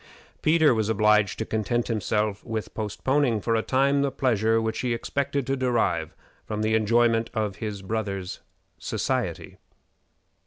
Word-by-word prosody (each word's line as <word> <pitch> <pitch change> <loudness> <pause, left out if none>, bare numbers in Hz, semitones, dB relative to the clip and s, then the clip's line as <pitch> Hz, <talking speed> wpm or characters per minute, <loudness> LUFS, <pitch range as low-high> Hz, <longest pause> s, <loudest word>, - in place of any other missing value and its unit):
Peter 155 -3 +4
was 110 -2 0
obliged 105 -2 +3
to 110 - -2
content 115 +2 -1
himself 105 -1 -1
with 110 -1 -5
postponing 120 +3 0
for 115 +3 -1
a 110 - +2
time 140 +3 +2
the 140 - +1
pleasure 115 -4 +1
which 110 0 -2
he 120 -1 0
expected 140 +2 -2
to 135 - 0
derive 100 - 0 0.3
from 105 0 -3
the 110 0 +1
enjoyment 115 +1 +3
of 105 -3 -1
his 105 -3 -5
brother's 100 -3 -3 0.4
society. - - -2
110 Hz, 145 wpm, -25 LUFS, 105-125 Hz, 0.4 s, Peter